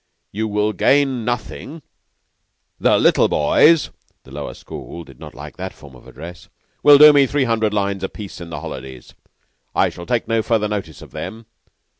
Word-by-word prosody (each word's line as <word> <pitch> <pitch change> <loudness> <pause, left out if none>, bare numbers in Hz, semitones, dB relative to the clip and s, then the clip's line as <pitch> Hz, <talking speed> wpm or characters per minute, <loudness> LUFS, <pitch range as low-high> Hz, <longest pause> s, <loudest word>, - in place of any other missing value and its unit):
You 110 +2 -2
will 105 0 0
gain 135 +3 +2
nothing. 125 +6 -5 1.0
The - - +3
little - - +4
boys 150 - +3 0.3
(the 65 - -17
Lower 75 +2 -6
School 85 - -9
did 70 -5 -17
not - - -11
like 75 +3 -10
that 95 0 -6
form 70 -2 -15
of 60 - -17
address) 85 +4 -11 0.3
will 145 -1 +8
do 150 +1 +9
me 140 -2 +5
three 145 0 0
hundred 110 -3 +1
lines 100 -2 -1
apiece 100 -1 -7
in 85 - -8
the 80 - -6
holidays. 65 -1 -9 0.6
I - - +3
shall 85 - -10
take 120 -2 -1
no 115 -1 +1
further 110 -1 0
notice 95 -9 -5
of - - -14
them. 115 +1 -7
105 Hz, 175 wpm, -20 LUFS, 85-120 Hz, 1.0 s, do